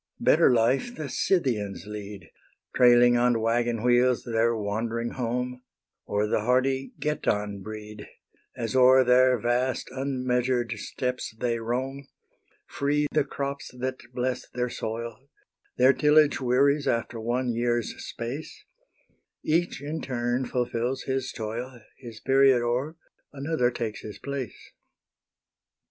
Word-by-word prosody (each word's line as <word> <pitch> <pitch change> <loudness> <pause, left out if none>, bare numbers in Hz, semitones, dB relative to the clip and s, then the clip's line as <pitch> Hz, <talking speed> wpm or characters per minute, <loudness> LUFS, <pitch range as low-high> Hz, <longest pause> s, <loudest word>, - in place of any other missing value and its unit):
Better - - +5
life 125 - +2
the 150 - -5
Scythians 115 - 0
lead, 105 -3 -8 0.4
Trailing 120 -1 +6
on 120 -1 +3
waggon 115 0 0
wheels 125 0 +3
their 115 0 +1
wandering 115 +3 -2
home, 125 +1 -3 0.5
Or 105 +1 0
the 105 - +1
hardy 130 +3 +1
Getan 105 -9 -1
breed, 105 0 -8 0.5
As 115 -2 -3
o'er 130 +1 +7
their 125 0 +5
vast 125 +3 -1
unmeasured 125 -2 -1
steppes 125 -3 -4
they 115 0 -1
roam; 130 +4 -3 0.6
Free 145 +1 0
the 150 - +2
crops 140 0 -5
that 130 +1 -3
bless 125 0 -3
their 125 0 -2
soil; 115 +4 -6 0.5
Their 130 +2 +6
tillage 150 -1 +4
wearies 140 +3 +2
after 115 0 -1
one 120 +2 -1
year's 120 0 0
space; 125 +7 -6 0.8
Each 165 -2 0
in 155 +2 -4
turn 120 0 -1
fulfils 120 +1 -2
his 130 -1 -2
toil; 120 +3 -5 0.2
His 115 -4 -10
period 135 -2 +4
o'er, 125 +7 -1 0.4
another 140 -2 0
takes 115 -3 -4
his 105 - -8
place. 140 -4 -6
125 Hz, 120 wpm, -26 LUFS, 115-130 Hz, 0.8 s, o'er